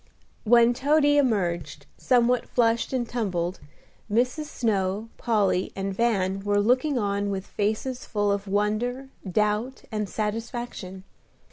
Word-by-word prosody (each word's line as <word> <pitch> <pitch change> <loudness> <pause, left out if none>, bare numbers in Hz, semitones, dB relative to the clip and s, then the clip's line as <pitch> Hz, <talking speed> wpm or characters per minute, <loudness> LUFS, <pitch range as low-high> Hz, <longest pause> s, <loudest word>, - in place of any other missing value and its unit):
When 235 +1 +6
Toady 290 +3 +3
emerged, 170 - -1
somewhat 245 0 +2
flushed 230 -1 +1
and 250 -3 -1
tumbled, 185 -7 -2 0.5
Mrs. 250 +7 +1
Snow, 210 -5 -1
Polly, 205 -5 +1
and 195 0 -3
Van 195 -3 +1
were 205 +1 +1
looking 255 +6 +2
on 200 -2 0
with 195 -1 -3
faces 220 +5 -2
full 205 -2 0
of 200 0 -2
wonder, 215 +6 -1 0.2
doubt, 215 +6 0
and 210 -2 -2
satisfaction. 215 -3 -4
215 Hz, 120 wpm, -26 LUFS, 200-245 Hz, 0.5 s, When